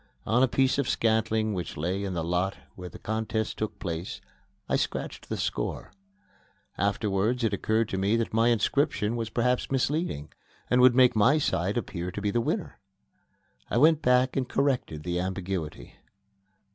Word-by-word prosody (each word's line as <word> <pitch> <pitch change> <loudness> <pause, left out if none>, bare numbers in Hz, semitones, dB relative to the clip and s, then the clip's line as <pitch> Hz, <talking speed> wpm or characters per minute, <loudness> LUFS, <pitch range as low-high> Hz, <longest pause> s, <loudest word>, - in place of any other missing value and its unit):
On 115 +3 +2
a 130 - +5
piece 130 +2 +2
of 140 - 0
scantling 110 -1 +1
which 90 -4 -5
lay 90 +6 -2
in 95 -2 -3
the 85 - -1
lot 90 +3 -1 0.2
where 90 -1 -8
the - - -11
contest 110 0 -2
took 110 - -3
place, 85 0 -5 0.5
I - - +1
scratched - - -3
the - - -2
score. - - -3 0.8
Afterwards 105 +4 0
it 110 -3 +1
occurred 110 +3 +1
to 95 - -2
me 100 +3 +2
that 115 -1 -1
my 115 +1 +3
inscription 120 -1 +1
was 115 -2 -3
perhaps 125 +2 0
misleading 135 - -1 0.4
and 125 0 +5
would 125 -1 +7
make 125 -2 +5
my 125 +8 +5
side 100 - 0
appear 90 -6 -3
to 105 - -4
be 105 0 -1
the 120 - +1
winner. - - -3 0.9
I - - 0
went 155 +4 +5
back 125 -1 +3
and 130 -2 -1
corrected 125 - 0
the 90 0 -1
ambiguity. 95 -3 -4
110 Hz, 170 wpm, -27 LUFS, 95-125 Hz, 0.9 s, would